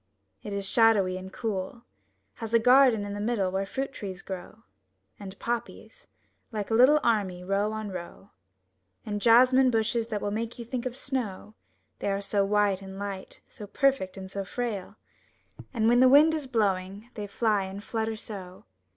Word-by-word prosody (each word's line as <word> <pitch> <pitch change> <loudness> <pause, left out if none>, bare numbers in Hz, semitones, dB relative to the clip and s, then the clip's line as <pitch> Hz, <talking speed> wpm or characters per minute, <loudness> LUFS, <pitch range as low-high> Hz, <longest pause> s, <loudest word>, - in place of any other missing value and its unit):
It 210 - -7
is 200 -1 -3
shadowy 210 -5 +4
and 185 +1 -7
cool; 210 +1 -4 0.5
Has 225 -1 -2
a - - +9
garden 250 -3 +5
in 200 - -5
the 205 - -5
middle 205 -4 0
where 195 +1 -2
fruit 270 +5 -4
trees 190 -2 -7
grow, 190 +4 -8 0.6
And 195 -1 -9
poppies, 240 - -5 0.4
like 210 -1 -4
a - - +2
little 260 +6 +6
army, 195 -6 0
row 200 +3 0
on 215 -2 -5
row. 185 +2 -9 0.7
And 205 -1 -3
jasmine 255 +3 +6
bushes 230 0 0
that 215 -3 -3
will 205 - -3
make 225 +2 -4
you 235 - -7
think 245 +1 -3
of 250 0 -7
snow, 230 -7 -4 0.5
They - - -2
are 195 0 0
so 200 0 0
white 200 -1 +1
and 190 0 -9
light, 200 -1 -7
so 210 - -11
perfect 265 -6 +1
and 190 -1 -8
so 200 0 -3
frail. 210 -2 -4 0.8
And 225 -3 +1
when 240 +1 +5
the 255 0 +7
wind 300 +4 +7
is 305 -4 -3
blowing 205 -1 -1
they 210 -2 -6
fly 210 -2 +1
and 195 +2 -8
flutter 225 0 -2
so! 190 -4 -9
210 Hz, 175 wpm, -27 LUFS, 195-235 Hz, 0.8 s, a